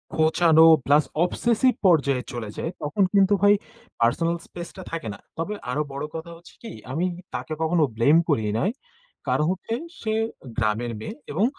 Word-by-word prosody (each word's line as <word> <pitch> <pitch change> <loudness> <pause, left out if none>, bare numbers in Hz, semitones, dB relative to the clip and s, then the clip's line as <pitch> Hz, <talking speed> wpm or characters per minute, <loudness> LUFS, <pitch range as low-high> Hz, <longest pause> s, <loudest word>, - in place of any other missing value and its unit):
খোঁচানো 160 0 +5 0.2
plus 145 +2 +5 0.2
obsessive 235 +7 +2
পর্যায়ে 140 -7 +3
চলে 115 -3 -5
যায়, 165 - -3
তখন 150 +7 0
কিন্তু 200 0 +4
ভাই 205 0 +6 0.5
পার্সোনাল 165 +9 +2
স্পেস 175 -1 -8
টা 185 - -7
থাকে 165 -9 -4
না। - - -12 0.2
তবে 165 +6 -2 0.2
আরও 150 +4 0
বড় 140 +2 -3
কথা 165 +1 -6
হচ্ছে 175 - -17
কি, 225 - -7 0.2
আমি 165 +7 0 0.3
তাকে 155 - -4
কখনো 160 0 +2
ব্লেম 140 +8 +5
করি 115 -7 +2 0.2
নাই। 200 - +1 0.6
কারণ 150 - +2
হচ্ছে, 190 +5 -4 0.3
সে 220 -1 -1 0.4
গ্রামের 115 +1 0
মেয়ে 215 - -6 0.2
এবং 190 +9 +2
160 Hz, 165 wpm, -24 LUFS, 140-185 Hz, 0.6 s, ভাই